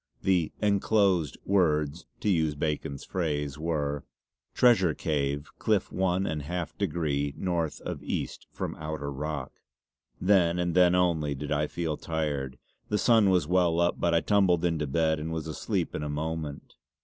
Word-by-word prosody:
The 90 Hz, -5 st, +2 dB
"encloased" 100 Hz, -, +2 dB
words, 80 Hz, -4 st, +1 dB
to 105 Hz, -, +1 dB
use 80 Hz, -4 st, +1 dB
Bacon's 75 Hz, -2 st, -3 dB
phrase, 75 Hz, -5 st, -2 dB
were: 75 Hz, -3 st, -1 dB, 0.5 s
"Treasure 100 Hz, -10 st, +4 dB
Cave 70 Hz, -1 st, -2 dB
cliff 105 Hz, -4 st, +1 dB
one 95 Hz, 0 st, +1 dB
and 75 Hz, -4 st, -2 dB
half 85 Hz, +3 st, -4 dB
degree 75 Hz, -6 st, -1 dB
Northe 85 Hz, -4 st, -1 dB
of -, -, -4 dB
East -, -, -4 dB
from -, -, -4 dB
outer 75 Hz, -2 st, -4 dB
rock." 70 Hz, -1 st, -4 dB, 0.7 s
Then 90 Hz, -3 st, +3 dB
and 90 Hz, -1 st, 0 dB
then 90 Hz, 0 st, +5 dB
only 80 Hz, -5 st, +1 dB
did 75 Hz, +2 st, -6 dB
I 75 Hz, 0 st, +1 dB
feel 80 Hz, -2 st, -3 dB
tired. 75 Hz, -5 st, -3 dB, 0.3 s
The 105 Hz, -, +1 dB
sun 110 Hz, -3 st, +4 dB
was 90 Hz, -5 st, +3 dB
well 85 Hz, 0 st, +2 dB
up 85 Hz, 0 st, +1 dB
but 85 Hz, -1 st, +2 dB
I 85 Hz, -, +4 dB
tumbled 95 Hz, -5 st, +3 dB
into 80 Hz, -3 st, 0 dB
bed 80 Hz, +2 st, +1 dB
and 80 Hz, +2 st, -4 dB
was 80 Hz, -1 st, -3 dB
asleep 80 Hz, -1 st, -2 dB
in -, -, -3 dB
a 75 Hz, -, -3 dB
moment. 75 Hz, -1 st, -4 dB
80 Hz, 160 wpm, -28 LUFS, 75-90 Hz, 0.7 s, then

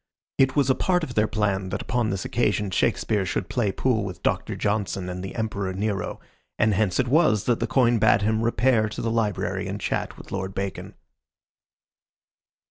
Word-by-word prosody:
It 135 Hz, -1 st, +4 dB
was 140 Hz, -3 st, +3 dB
a -, -, +5 dB
part 180 Hz, +4 st, +1 dB
of 130 Hz, -, -4 dB
their 105 Hz, -1 st, +2 dB
plan 100 Hz, -3 st, -1 dB
that -, -, -3 dB
upon 120 Hz, -2 st, 0 dB
this 95 Hz, -1 st, -3 dB
occasion 105 Hz, -4 st, 0 dB
Shakespeare 105 Hz, +2 st, +1 dB
should 95 Hz, -1 st, -3 dB
play 115 Hz, -6 st, 0 dB
pool 110 Hz, +1 st, 0 dB
with 95 Hz, -3 st, -7 dB
Doctor -, -, 0 dB
Johnson 100 Hz, -3 st, -1 dB
and 90 Hz, 0 st, -5 dB
the 95 Hz, -, -6 dB
Emperor 100 Hz, -4 st, -2 dB
Nero, 100 Hz, +1 st, -2 dB, 0.4 s
and 110 Hz, -1 st, +3 dB
hence 100 Hz, -2 st, +1 dB
it 130 Hz, -, +2 dB
was 120 Hz, -7 st, +3 dB
that 120 Hz, +1 st, +1 dB
the -, -, -1 dB
coin 120 Hz, -3 st, +3 dB
bade 105 Hz, -1 st, +4 dB
him 110 Hz, +1 st, +1 dB
repair 115 Hz, -1 st, +2 dB
to -, -, -6 dB
the 115 Hz, -, 0 dB
library 110 Hz, -4 st, -1 dB
and -, -, -4 dB
chat -, -, -2 dB
with -, -, -13 dB
Lord 95 Hz, 0 st, -4 dB
Bacon. 100 Hz, -1 st, -4 dB
110 Hz, 190 wpm, -25 LUFS, 100-120 Hz, 0.4 s, a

